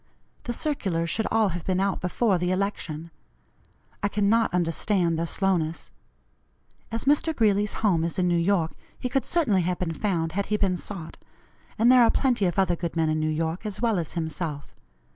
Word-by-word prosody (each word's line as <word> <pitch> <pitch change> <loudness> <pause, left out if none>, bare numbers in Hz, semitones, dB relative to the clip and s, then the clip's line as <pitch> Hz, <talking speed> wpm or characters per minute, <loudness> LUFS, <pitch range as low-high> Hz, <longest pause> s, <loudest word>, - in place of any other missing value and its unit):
The 240 - -2
circulars 190 - -1
should 220 - 0
all 220 -2 +2
have 175 -1 -5
been 185 -1 0
out 195 -1 0
before 185 +1 +1
the 180 +1 0
election. 170 -4 -3 0.9
I 205 - +2
cannot 210 +3 +2
understand 175 0 +1
their 170 - -1
slowness. 165 - -1 1.0
As 230 +2 -3
Mr. 295 +3 +2
Greeley's 210 -3 +2
home 170 -6 +3
is 170 +3 -3
in 180 -1 +2
New 175 - +2
York, 170 -2 +1 0.3
he 250 - -3
could 270 +1 0
certainly 235 - +2
have 180 +1 -1
been 170 -3 -2
found 165 -3 -1
had 200 +4 -2
he 210 - +1
been 195 -3 +1
sought; 175 -3 -6 0.6
and 235 +3 +5
there 255 -1 +7
are 230 - +6
plenty 245 -6 +2
of 175 - -3
other 185 -3 +2
good 170 0 -4
men 160 -1 +1
in 155 0 0
New 155 0 0
York, 160 +3 -2
as 210 -3 -4
well 230 -5 +1
as 165 - -5
himself. 160 -3 -4
185 Hz, 190 wpm, -26 LUFS, 165-210 Hz, 1.0 s, there